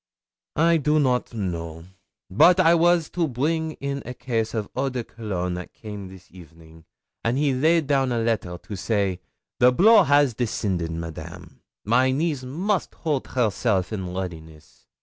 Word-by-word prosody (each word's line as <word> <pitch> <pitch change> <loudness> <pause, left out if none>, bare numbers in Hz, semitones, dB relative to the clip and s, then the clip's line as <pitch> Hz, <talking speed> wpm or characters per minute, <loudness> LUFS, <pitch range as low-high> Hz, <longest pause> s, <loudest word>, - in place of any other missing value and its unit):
'I 165 +2 +4
do 150 +1 +2
not 125 -3 +1
know. 85 -5 -4 0.5
Bote 175 - +5
I 170 -2 +6
was 170 -1 +3
to 170 -2 0
bring 155 +5 -1
in 140 -1 -4
a 125 - -7
case 115 -3 -2
of 105 -2 -2
eau 135 +1 0
de 125 -2 -4
cologne 95 -6 -4
that 90 0 -7
came 105 -3 -8
this 95 0 -15
evening, 80 -2 -16 0.4
and 115 +3 0
he 145 -1 +2
laid 160 +5 +2
down 135 -2 +1
a 120 - 0
letter 110 -6 -1
and 100 -3 -6
say: 100 -4 0 0.4
"The 125 +1 +6
blow 215 - +6
has 145 -2 +3
descended, 100 -7 -2
Madame! 80 -1 -8 0.2
My 125 +5 +3
niece 145 +1 -1
must 180 +10 -2
hold 150 -5 -2
herself 110 -4 0
in 95 -4 -4
readiness." 80 -5 -8
120 Hz, 160 wpm, -24 LUFS, 95-145 Hz, 0.5 s, I